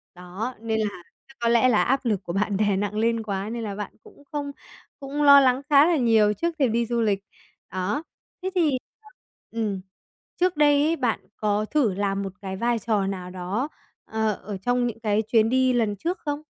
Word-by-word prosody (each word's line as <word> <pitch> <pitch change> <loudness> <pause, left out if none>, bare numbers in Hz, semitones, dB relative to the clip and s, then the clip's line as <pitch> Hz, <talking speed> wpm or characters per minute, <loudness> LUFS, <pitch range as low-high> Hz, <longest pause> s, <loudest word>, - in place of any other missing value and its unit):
Đó, 185 +8 -5
nên 220 -1 -1
là 205 -5 -3 0.2
chắc 270 - -18
có 235 0 +1
lẽ 235 +2 +4
là 220 - +4
áp 265 0 0
lực 205 -4 0
của 170 - -5
bạn 200 0 0
đè 205 -2 +2
nặng 205 +1 -2
lên 230 0 +1
quá, 200 0 -3
nên 235 0 -4
là 205 -2 -4
bạn 205 -1 -5
cũng 285 - -17
không 285 -1 -3 0.5
cũng 285 +2 -3
lo 280 -1 +9
lắng 260 0 +3
khá 285 +1 +7
là 340 -2 +3
nhiều 220 -4 +4
trước 335 +6 -2
khi 265 - +4
đi 235 +1 +1
du 235 0 -1
lịch. 200 -2 +1 0.5
Đó. 190 - -2 0.4
Thế 375 - 0
thì 325 -5 +3 0.8
ừm, 210 -4 -2 0.6
trước 360 -3 +2
đây 290 -1 +5
ấy, 325 +2 +2
bạn 245 -7 0 0.2
có 210 0 0
thử 250 -7 +1
làm 200 0 -1
một 190 -1 -5
cái 190 -1 -5
vai 235 +1 +1
trò 210 -3 0
nào 185 -2 -4
đó, 185 +9 -3 0.4
ờ, 220 -1 0
ở 205 -1 -5
trong 245 +5 0
những 225 -1 -5
cái 215 -1 +1
chuyến 220 0 +2
đi 260 0 +3
lần 220 -4 +1
trước 345 - -3
không? 290 0 -3
225 Hz, 210 wpm, -25 LUFS, 205-265 Hz, 0.8 s, lo